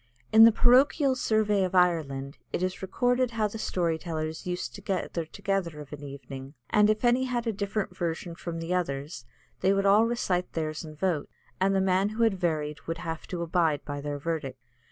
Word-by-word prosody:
In 220 +1 +10
the 230 - +8
Parochial 260 +4 +4
Survey 215 -5 +2
of 185 0 -2
Ireland 150 -6 +1
it 180 - -1
is 185 0 -2
recorded 245 +6 +1
how 225 -2 0
the 220 +2 -7
story 170 -6 0
tellers 160 0 -4
used 180 0 -3
to 200 - -9
gather 185 -4 -2
together 180 -3 -2
of 150 0 -10
an 150 - -8
evening, 140 0 -9 0.2
and 210 0 +5
if 215 +3 +1
any 245 +2 +3
had 245 -2 -2
a 225 - 0
different 200 +1 -3
version 170 0 -3
from 170 0 -6
the 165 +2 -3
others, 140 -6 -3 0.3
they 190 - +3
would 195 0 +1
all 210 +3 +5
recite 185 -7 -1
theirs 155 -1 -3
and 155 -1 -10
vote, 170 -4 -1 0.3
and 195 +1 +2
the 190 - +3
man 190 +1 +2
who 220 +2 -1
had 225 -3 +4
varied 150 -4 -1
would 165 0 -2
have 165 -1 -5
to 175 -2 -3
abide 165 -3 +1
by 145 -1 -4
their 145 0 -3
verdict. 140 -4 -4
180 Hz, 200 wpm, -28 LUFS, 155-210 Hz, 0.3 s, In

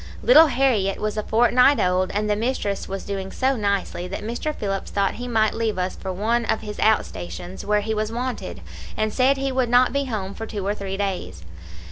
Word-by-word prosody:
Little 400 -10 +8
Harriett 245 -8 +1
was 215 0 -2
a 215 - -1
fortnight 240 +5 +4
old, 185 -1 +1
and 210 +1 0
the 210 - +2
mistress 215 -3 -2
was 195 0 -4
doing 195 -1 -4
so 270 +1 +1
nicely 200 -4 -1
that 195 - -6
Mr. 240 +7 -3
Phillips 195 -2 -3
thought 200 -1 0
he 245 - -4
might 220 -3 +2
leave 225 -3 -1
us 185 0 -2
for 190 - -5
one 225 +6 0
of 220 - 0
his 210 -1 -7
out 220 0 +3
stations, 175 +1 -8
where 210 0 +1
he 220 +2 -2
was 215 0 -2
wanted, 250 +2 -4 0.4
and 215 -1 0
said 270 +2 +3
he 270 0 -1
would 255 -2 0
not 245 +1 +4
be 280 0 0
home 205 -6 -4
for 225 +1 -6
two 205 -3 -5
or 200 - +1
three 195 -2 -5
days. 190 - -3
215 Hz, 215 wpm, -23 LUFS, 195-245 Hz, 0.4 s, Little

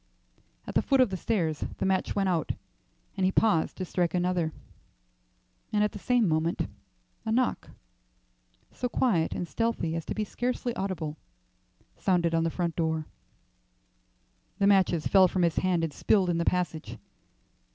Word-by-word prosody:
At - - -6
the - - +3
foot 270 -1 +2
of 255 -6 +4
the - - -1
stairs 170 -6 -1
the - - -1
match 190 -1 0
went 195 -1 +1
out, 170 -5 0 0.6
and 190 - -1
he 185 - +3
paused 200 -6 +2
to 185 - -3
strike 175 -1 0
another; 175 -2 +1 1.2
and 210 -1 +2
at 210 - +1
the 205 - -8
same 245 0 +2
moment 160 +1 0 0.6
a 220 - -2
knock, 250 +2 0 1.0
so 250 - -3
quiet 200 -11 +1
and 175 - -3
stealthy 225 -8 -1
as 165 - -3
to - - -4
be 215 - 0
scarcely 245 +2 -2
audible, 165 -6 -3 0.8
sounded 175 -3 +2
on 165 0 +2
the 165 - +1
front 170 0 -2
door. 160 -2 0 1.5
The 200 - +2
matches 190 -5 +3
fell 190 -2 +6
from 180 0 0
his 170 -2 +1
hand 180 -3 +1
and 160 -3 -2
spilled 185 +1 +2
in 170 - 0
the 170 - 0
passage. 170 -3 -1
180 Hz, 160 wpm, -28 LUFS, 165-205 Hz, 1.5 s, fell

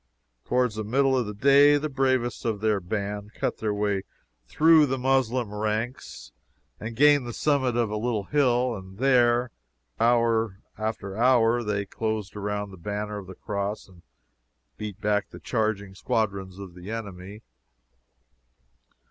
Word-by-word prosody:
Towards 125 -2 +1
the 110 0 -4
middle 135 +5 +2
of 125 -4 0
the 105 - -5
day 140 +5 +6
the 150 +2 -2
bravest 130 -3 0
of 110 -3 -1
their 105 -1 +1
band 105 +2 -4
cut - - -2
their 110 -1 -1
way 105 -1 0 0.5
through 155 - +5
the 135 0 -1
Moslem 130 -4 +1
ranks 110 - -4 0.5
and 115 +1 -6
gained 145 0 +5
the 120 - -5
summit 130 -4 +1
of 115 -3 +1
a 105 - -2
little 110 -2 -1
hill, 125 -2 +1
and 95 -1 -10
there, 125 -1 +3 0.5
hour 115 -3 +2 0.2
after 110 -3 -4
hour, 120 0 +4
they 105 -2 -2
closed 110 -1 -3
around 105 0 -3
the 95 - -11
banner 105 +3 -4
of 95 - -11
the 95 - -9
Cross, 100 0 -4
and 90 -2 -18 0.7
beat 105 -2 -7
back 105 -1 0
the - - -11
charging 110 -4 -2
squadrons 95 -2 -2
of 95 -3 -9
the 90 +2 -10
enemy. 105 -1 -7
110 Hz, 150 wpm, -26 LUFS, 100-125 Hz, 0.7 s, day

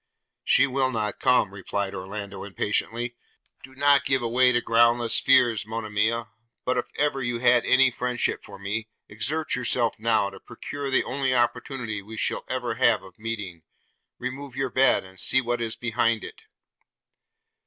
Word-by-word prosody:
'She - - +5
will 135 0 0
not 110 -4 -3
come,' 110 -6 +3
replied 100 0 -3
Orlando 100 +1 -6
impatiently: 115 +4 -2 0.5
'do 130 +1 -14
not 140 0 +4
give 135 -2 +1
way 125 +2 +4
to 120 - +2
groundless 120 0 +3
fears, 120 -5 +4
Monimia; 110 +1 -1 0.3
but, 125 - +1
if 125 - -1
ever 145 -2 0
you 120 -1 -2
had 120 0 +4
any 130 0 +5
friendship 125 0 -1
for - - -11
me, 105 +3 -4 0.2
exert 140 +9 -1
yourself 120 -2 +1
now, 110 -3 +2
to - - -12
procure 145 -1 -6
the 130 - +2
only 130 -1 -1
opportunity 120 -2 -1
we 110 +3 -10
shall - - -1
ever 125 -2 -2
have 115 -4 +4
of 95 +1 -16
meeting 105 -7 -5 0.3
– - - -49
remove 130 +1 -6
your 135 -1 -2
bed, 135 +1 +3
and 95 0 -12
see 130 - +4
what 120 -1 -2
is 115 -1 -2
behind 115 -1 0
it.' - - -11
120 Hz, 165 wpm, -25 LUFS, 110-130 Hz, 0.5 s, She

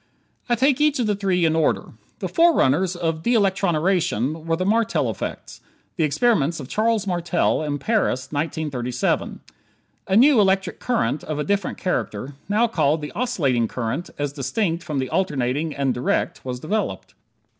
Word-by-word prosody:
I 240 - +4
take 270 +3 +2
each 300 -1 +3
of 245 - 0
the 210 - +1
three 190 -3 +1
in 160 0 +2
order. 160 - 0 0.3
The - - -1
forerunners 190 - +3
of 165 -2 -2
de 240 +7 +1
electroniration 175 - +1
were 165 - +2
the 185 +2 -2
Martel 225 +2 +1
effects - - -7 0.3
the 165 - 0
experiments 160 - +2
of 135 - -7
Charles 220 - +1
Martel, 175 -4 0
in 145 -2 -2
Paris, 175 - 0
in - - -6
1937. 140 -5 -2 0.7
A 190 - +1
new 260 -1 +6
electric 195 -1 +1
current, 235 - -1
of 155 - -3
a 150 - -1
different 200 0 -1
character 140 - -3 0.2
now 215 +3 +3
called 155 -8 +1
the 150 - -5
oscillating 150 - 0
current 125 +9 -3
as 145 -1 -2
distinct 165 - -1
from 150 -4 -4
the 130 -1 -1
alternating 145 -2 -1
and 135 -2 0
direct 125 - -1
was 125 -1 -4
developed. 155 - -3
165 Hz, 165 wpm, -22 LUFS, 140-205 Hz, 0.7 s, new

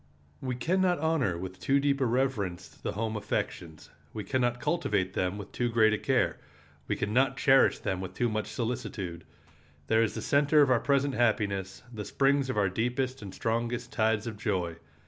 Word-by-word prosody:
We 130 -1 -2
can 175 +10 0
not 180 -2 +3
honor 145 - +1
with 95 +1 -7
too 135 +10 +2
deep 140 0 +1
a 130 - +3
reverence 110 -8 -1
the - - -6
home 110 +1 -2
affections; 90 -6 -4 0.2
we 105 - -4
can 130 +7 -1
not 120 0 0
cultivate 105 - 0
them 90 +2 -1
with 105 -1 -8
too 120 -1 -1
great 110 -2 +4
a 110 - -1
care; - - +1 0.5
we - - 0
can 105 - -2
not 135 +1 +3
cherish 135 0 +5
them 95 -1 -3
with 95 - -7
too 120 - +1
much 110 -2 -2
solicitude. 110 -6 -4 0.6
There 110 +7 +3
is 115 - 0
the - - -3
center 145 +1 +4
of 135 - +2
our 125 - +4
present 140 +1 +1
happiness, 100 -5 0
the 105 -2 -5
springs 135 +3 +1
of 130 - -2
our 100 -1 +3
deepest 125 +6 -1
and 100 -2 -7
strongest 120 +3 -2
tides 110 -2 +1
of 110 -3 -6
joy. 90 -7 -1
115 Hz, 195 wpm, -29 LUFS, 100-130 Hz, 0.6 s, cherish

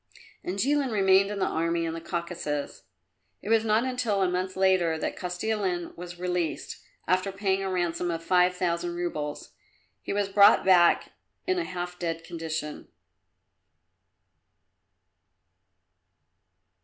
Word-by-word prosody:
And 185 +2 -4
Jilin 275 +3 +1
remained 195 -1 +4
in 205 - -4
the 195 - +1
army 165 +1 0
in 165 - -3
the 165 - -6
Caucasus. 170 -4 -4 0.6
It - - -6
was 225 -1 +4
not 220 +1 +2
until 250 -6 0
a - - +3
month 185 +1 -2
later 185 -4 +3
that - - -3
Kostilin 180 -1 -2
was 175 0 -8
released, 180 -2 -3 0.3
after 185 +2 +1
paying 195 0 0
a 195 - -2
ransom 175 -1 -1
of 165 -1 -3
five 180 +1 +3
thousand 175 -1 -1
roubles. 155 -4 -4 0.5
He - - -5
was 205 0 0
brought 200 +1 +6
back 180 -2 +5 0.3
in 370 0 +1
a - - 0
half 180 0 -5
dead 165 -1 -3
condition. 160 -2 -5
180 Hz, 130 wpm, -27 LUFS, 170-195 Hz, 0.6 s, brought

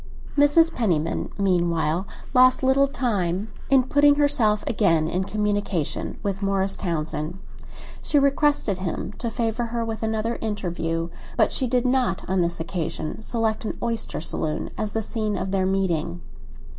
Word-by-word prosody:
Mrs. 295 +3 +5
Penniman, 165 -9 0
meanwhile, 175 -2 +1 0.3
lost 255 0 +5
little 270 +1 +4
time 205 - -1 0.2
in 265 -1 +5
putting 285 +2 +4
herself 250 -8 +2
again 165 -8 +2
in 185 +3 -1
communication 205 -6 -1
with 195 -1 -2
Morris 195 0 +1
Townsend. 160 -1 -3 0.6
She 295 - +1
requested 280 - +2
him 185 +2 -3
to 235 - -1
favour 230 0 -1
her 230 0 -2
with 225 -1 -4
another 220 +1 -1
interview, 170 -6 -2 0.3
but - - +4
she 260 - 0
did 250 +1 +1
not 250 -6 +1
on 185 0 +1
this 170 0 -1
occasion 165 +1 -4
select 220 -1 -1
an 220 - -4
oyster 230 -1 -2
saloon 155 -1 -2
as 215 -1 -3
the 225 - -1
scene 215 -1 -2
of 190 - -3
their 190 -1 +1
meeting. 175 -3 -1
210 Hz, 145 wpm, -24 LUFS, 175-240 Hz, 0.6 s, Mrs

